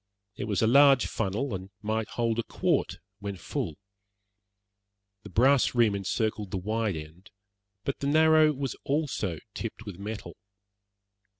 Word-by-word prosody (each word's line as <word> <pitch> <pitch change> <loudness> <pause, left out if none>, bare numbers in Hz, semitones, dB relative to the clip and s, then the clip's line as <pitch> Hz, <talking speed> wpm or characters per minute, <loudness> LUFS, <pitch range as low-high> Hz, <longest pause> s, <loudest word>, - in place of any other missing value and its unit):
It - - -4
was 105 -3 0
a - - +5
large 135 +2 +6
funnel, 110 +7 -2
and 95 0 -5
might 110 0 -1
hold 115 -1 0
a - - +1
quart - - 0 0.2
when 100 -1 -5
full. 80 -2 -4 1.5
The - - -11
brass 130 +2 +4
rim 115 -4 +4
encircled 105 +1 -1
the 95 - -3
wide 110 +1 -1
end, 80 +5 -10 0.5
but 140 - -3
the 140 - -2
narrow 155 +1 +5
was 135 -3 -3
also 135 - -1 0.2
tipped 110 -1 -6
with 100 -4 -8
metal. 105 +1 -6
110 Hz, 140 wpm, -28 LUFS, 100-135 Hz, 1.5 s, large